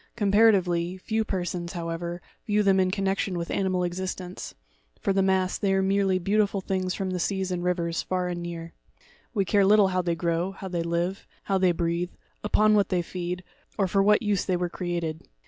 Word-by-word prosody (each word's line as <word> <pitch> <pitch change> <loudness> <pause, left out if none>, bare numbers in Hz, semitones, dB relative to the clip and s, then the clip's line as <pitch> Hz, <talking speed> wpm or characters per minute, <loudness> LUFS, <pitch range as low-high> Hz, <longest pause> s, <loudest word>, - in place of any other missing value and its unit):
Comparatively, 195 -5 +3
few 220 +4 -1
persons, 180 -3 -3
how 170 -2 -4
ever, 170 +1 -4 0.2
view 210 0 +2
them 195 -1 +4
in 185 -1 +3
connection 195 -1 -1
with 170 0 -4
animal 185 -2 0
existence—for 175 - -5
the 195 - +3
mass, 190 -1 +1
they 195 -2 +2
are 190 - +2
merely 195 -1 +2
beautiful 200 +2 +1
things 185 -1 -2
from 190 -1 -2
the 180 - -2
seas 190 +1 -1
and 175 -1 -2
rivers, 170 -2 0
far 185 -1 -1
and 175 -1 -3
near. 170 -1 -6 0.6
We 200 -2 +2
care 200 +2 +3
little 205 0 +5
how 185 0 +1
they 170 -1 -1
grow, 170 +2 -1
how 195 -1 -7
they 175 -2 -1
live, 170 +3 -2 0.2
how 195 -1 +1
they 185 -1 +4
breathe, 170 +1 -1 0.3
upon 215 0 +4
what 205 -2 +3
they 180 -2 +1
feed, 180 +1 -4 0.3
or 195 -3 +2
for 195 +1 +2
what 210 +3 +4
use 205 -3 +1
they 185 -2 0
were 175 0 -1
created. 170 -3 -3
185 Hz, 195 wpm, -26 LUFS, 175-195 Hz, 0.6 s, little